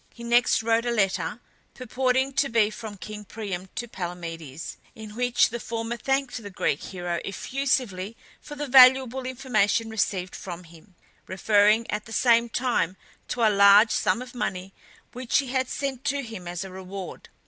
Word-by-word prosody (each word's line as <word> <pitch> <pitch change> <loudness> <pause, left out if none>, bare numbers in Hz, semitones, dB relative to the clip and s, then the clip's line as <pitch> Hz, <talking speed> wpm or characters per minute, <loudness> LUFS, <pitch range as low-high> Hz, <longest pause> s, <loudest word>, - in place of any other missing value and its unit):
He 235 - -12
next 235 -1 +3
wrote 230 +1 +1
a - - +1
letter, 210 0 0 0.4
purporting 260 +2 0
to 275 +1 +1
be 220 -2 +2
from 215 -2 -8
king 210 +2 -8
Priam 195 -4 -6
to 240 - -4
Palamedes, 170 - -7 0.2
in 215 -1 -10
which 245 0 +2
the 235 - -5
former 230 0 -4
thanked 270 0 -1
the 205 - -8
Greek 170 -6 -1
hero 175 -2 -4
effusively 230 -3 -2 0.2
for 295 - -9
the 295 0 -4
valuable 260 -1 +6
information 230 -4 0
received 190 -4 -1
from 180 -1 -7
him, 170 +3 -18 0.3
referring 210 +3 +3
at 210 0 -3
the 225 - -10
same 235 0 +3
time 235 -7 0 0.3
to 240 - -2
a 215 - +2
large 200 +2 +7
sum 245 - +1
of 250 - -13
money 190 -5 -4 0.4
which 250 -1 0
he 275 -3 0
had 260 0 -1
sent 275 -2 -4
to 280 0 0
him 225 -7 -8
as 175 +2 -4
a 190 - -9
reward. 190 0 -8
225 Hz, 170 wpm, -25 LUFS, 195-250 Hz, 0.4 s, large